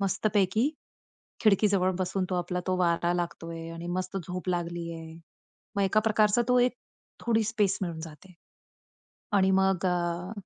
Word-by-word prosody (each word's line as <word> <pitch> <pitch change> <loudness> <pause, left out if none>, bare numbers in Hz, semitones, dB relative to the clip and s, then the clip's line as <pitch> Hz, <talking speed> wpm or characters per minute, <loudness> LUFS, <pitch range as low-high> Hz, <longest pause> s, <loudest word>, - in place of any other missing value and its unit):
मस्त 195 +1 0
पैकी 210 +7 +3 0.7
खिडकीजवळ 200 -3 +4
बसून 185 +1 -1
तो - - 0
आपला 180 0 -1
तो 185 -1 +1
वारा 170 -1 +2
लागतो 170 -1 -3
आहे 165 0 -6
आणि 165 +1 -7
मस्त 185 +1 -3
झोप 180 +1 -5
लागली 170 -1 -2
आहे. 160 -1 -8 0.6
मग 200 - +2
एका 195 +2 +3
प्रकारचा 215 +1 +3
तो 250 0 +5
एक 250 0 +3 0.5
थोडी 225 -1 +2
स्पेस 205 -4 +1
मिळून 170 -3 -3
जाते 160 +3 -11 1.1
आणि 190 0 +4
मग 190 -1 +2
अ, 175 0 -1
185 Hz, 155 wpm, -28 LUFS, 175-200 Hz, 1.1 s, तो